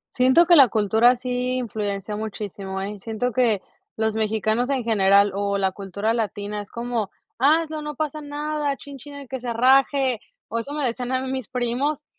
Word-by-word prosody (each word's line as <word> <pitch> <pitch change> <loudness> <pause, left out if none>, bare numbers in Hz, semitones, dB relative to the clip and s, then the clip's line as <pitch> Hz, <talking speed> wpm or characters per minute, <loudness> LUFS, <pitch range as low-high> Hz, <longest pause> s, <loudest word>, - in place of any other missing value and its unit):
Siento 260 +7 +5
que 345 +1 +6
la 275 -5 +8
cultura 220 +3 +4
sí 250 0 -2
influencia 210 -4 -3
muchísimo, 200 -2 -5
eh. 205 +1 -5
Siento 225 +4 -2
que 225 -5 +2 0.3
los 220 0 0
mexicanos 220 +3 0
en 270 -3 0
general 200 -2 +4
o 200 0 -1
la 190 -1 +1
cultura 200 +3 -2
latina 210 -2 -3
es 205 - -12
como: 235 -3 -3 0.3
"Hazlo 310 +3 +2
no 300 0 -5
pasa 305 +1 -3
nada, 295 -1 -2
chin 280 -1 -11
chin 290 +1 -11
el 280 -1 -9
que 260 +1 -5
se 240 -1 -4
raje", 260 0 +3 0.3
o 230 - -1
eso 255 +5 -6
me 295 -2 -1
decían 245 +1 -2
a 260 - +1
mí 260 0 -4
mis 260 -4 -3
primos, 265 +4 -1
240 Hz, 185 wpm, -23 LUFS, 210-270 Hz, 0.3 s, la